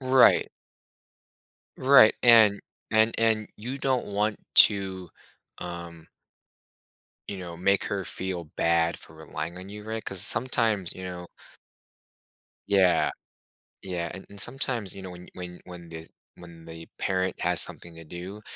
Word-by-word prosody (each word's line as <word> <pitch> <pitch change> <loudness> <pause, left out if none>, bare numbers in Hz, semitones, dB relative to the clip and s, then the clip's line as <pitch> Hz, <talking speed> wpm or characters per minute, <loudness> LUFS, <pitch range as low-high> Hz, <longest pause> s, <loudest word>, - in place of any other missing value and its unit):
Right. 130 -1 +4 1.3
Right, 130 -4 +6
and 110 -4 +6 0.3
and 110 +1 +2
and 110 -2 +1
you 125 +6 -6
don't 130 -2 -1
want 105 +1 -2 0.3
to, 95 -3 -6 0.5
um 85 -2 -9 1.2
you 100 - -5
know, 85 -2 -9
make 100 +2 +1
her 100 -2 -3
feel 95 -2 -3
bad 85 0 +1
for 80 - -13
relying 80 +2 -7
on 95 +1 -10
you, 105 +1 -10
right? 110 0 -5
'Cause 95 -2 +2
sometimes, 110 -5 +3
you 95 - -9
know 90 -1 -8 1.4
Yeah. 95 -3 +3 0.7
Yeah, 90 -3 -4
and 95 - -10
and 100 - -14
sometimes, 120 -4 -1
you 100 - -9
know, 95 - -8
when 90 -1 -11
y - - -16
when 90 -1 -9
when 90 -1 -12
the 80 -1 -9 0.3
when 85 -2 -14
they 80 0 -11
parent 95 -1 -2
has 90 -1 +3
something 85 -1 -1
to 80 - -11
do 90 +6 -9
95 Hz, 140 wpm, -26 LUFS, 85-110 Hz, 1.4 s, Right